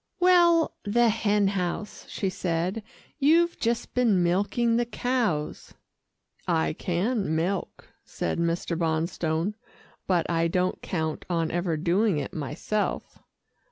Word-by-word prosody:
"Well 345 -2 +5
the 235 +3 +3
hen 210 -2 +2
house," 195 +2 -4
she 195 - -2
said. 180 +3 -2 0.4
"You've 335 +4 +3
just 235 0 -1
been 225 -8 +3
milking 205 +6 +1
the 240 - +1
cows." 235 -12 -2 0.7
"I 80 -1 +1
can 190 0 -1
milk," 180 +4 -2 0.2
said - - -3
Mr. 170 0 -1
Bonstone, 165 +2 -1 0.5
"but 175 -3 +2
I 165 -1 +1
don't 180 +2 0
count 160 -3 -3
on 165 -2 0
ever 175 -2 -1
doing 180 +4 +2
it 145 - -4
myself." 155 +8 -3
185 Hz, 120 wpm, -26 LUFS, 165-230 Hz, 0.7 s, Well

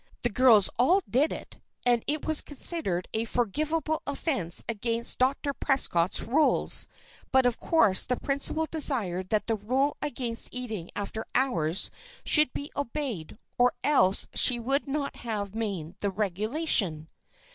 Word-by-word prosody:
The 240 - +1
girls 225 -4 +4
all 360 +10 +3
did 280 +6 +1
it, - - -9 0.2
and 240 -2 +2
it 300 +1 -1
was 315 -1 +5
considered 280 - 0
a 220 - +1
forgivable 305 +8 -2
offence 275 - 0
against 230 +1 -2
Dr. 275 +2 0
Prescott's 195 - +2
rules; 295 +7 +2 0.4
but 265 -1 +3
of 245 -1 0
course 225 - +3
the 250 - -2
principal 280 +3 0
desired 225 - +1
that 215 0 0
the 225 -1 -1
rule 260 +8 -1
against 245 -5 -1
eating 220 -9 -4
after 215 +2 -4
hours 180 -10 0 0.3
should 300 -4 +5
be 285 - -7
obeyed, 250 - -5 0.2
or 245 0 +3
else 195 -10 +2
she 245 -1 +6
would 270 +5 -2
not 280 0 -4
have 205 -4 -5
made 190 -7 -5
the 200 - -2
regulation. 200 - -1
245 Hz, 140 wpm, -27 LUFS, 205-285 Hz, 0.4 s, she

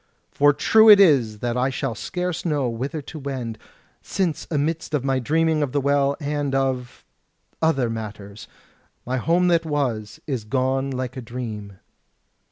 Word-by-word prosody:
For 145 0 +4
true 220 +10 +5
it 205 -2 +10
is 125 - +4
that 120 -1 -1
I 125 +2 +1
shall 135 -2 -3
scarce 180 - -4
know 150 -6 0
whither 135 +7 -4
to 155 +3 -9
wend; 130 -6 -5 0.4
since 180 -6 -2
amidst 155 +1 -1
of 135 -2 -2
my 135 -1 +1
dreaming 160 +3 +1
of 140 -4 -2
the 145 - +2
Well, 140 0 +1
and 145 -2 -2
of...other 135 +2 -3
matters, 105 -2 -7 0.6
my 130 +1 -1
home 170 +7 +2
that 170 -1 +3
was 130 -9 -2
is 130 -7 -3
gone 130 +4 0
like 130 0 -4
a - - -4
dream." 110 -5 -7
135 Hz, 155 wpm, -23 LUFS, 120-150 Hz, 0.6 s, it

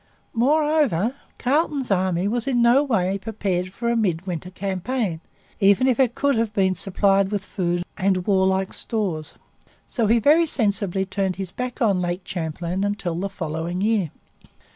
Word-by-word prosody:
Moreover, 275 - +2 0.2
Carleton's 280 -2 0
army 185 -1 +1
was 240 +3 -1
in 255 -3 +2
no 240 +4 +5
way 195 -7 0
prepared 190 -4 -2
for 235 +5 -4
a 235 - +2
midwinter 180 -4 -1
campaign, 190 0 -3 0.4
even 200 +4 +4
if 260 -1 +2
it 250 -3 +3
could 280 0 +2
have 225 -1 0
been 190 -3 +2
supplied 195 +1 +2
with 205 -1 -3
food 175 -2 -1 0.2
and 185 -2 +1
warlike 190 -1 +2
stores. 180 -9 -3 0.5
So 230 -4 0
he 230 +3 +4
very 305 +8 +4
sensibly 200 - +1
turned 190 -1 -1
his 190 -2 -5
back 250 +2 -3
on 200 -5 +2
Lake 175 +1 -2
Champlain 170 +2 -3
until 205 -4 -2
the 185 +4 -3
following 170 0 -4
year. 210 -5 +1
195 Hz, 155 wpm, -23 LUFS, 185-235 Hz, 0.5 s, no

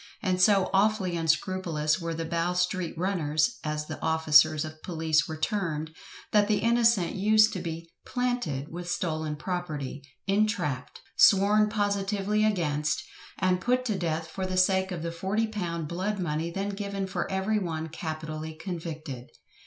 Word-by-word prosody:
And 185 -2 +1
so 195 -1 +4
awfully 195 -2 +2
unscrupulous 165 -1 0
were 165 -1 -3
the 165 0 -3
"Bow 170 +2 0
street 180 -1 -1
runners," 165 0 0
as 150 0 -2
the 155 -2 -7
officers 155 -1 +4
of 155 0 -10
police 160 -3 +1
were 160 - -5
termed, 160 -4 -2 0.4
that 205 -1 +4
the 210 -1 +2
innocent 230 -6 +3
used 215 +2 +4
to 185 - -3
be 165 -1 -5 0.2
"planted" 245 - -2
with 175 +1 -6
stolen 155 -3 -2
property, 150 -5 -4 0.2
entrapped, 195 -10 -1 0.2
sworn 210 +2 +5
positively 205 0 0
against, 150 -8 0 0.3
and 185 -1 +1
put 250 +3 +1
to 215 -4 0
death 165 -3 -1
for 185 +3 -4
the 185 0 -2
sake 190 0 +3
of 170 -3 -4
the 170 - -2
£40 190 -2 -2
"blood 190 +6 -2
money" 165 -2 -2
then 195 +4 -3
given 200 -1 -3
for 190 - -3
every 195 +3 0
one 160 -4 -3
capitally 155 -1 -5
convicted. 160 -6 -6
175 Hz, 150 wpm, -28 LUFS, 155-200 Hz, 0.4 s, sworn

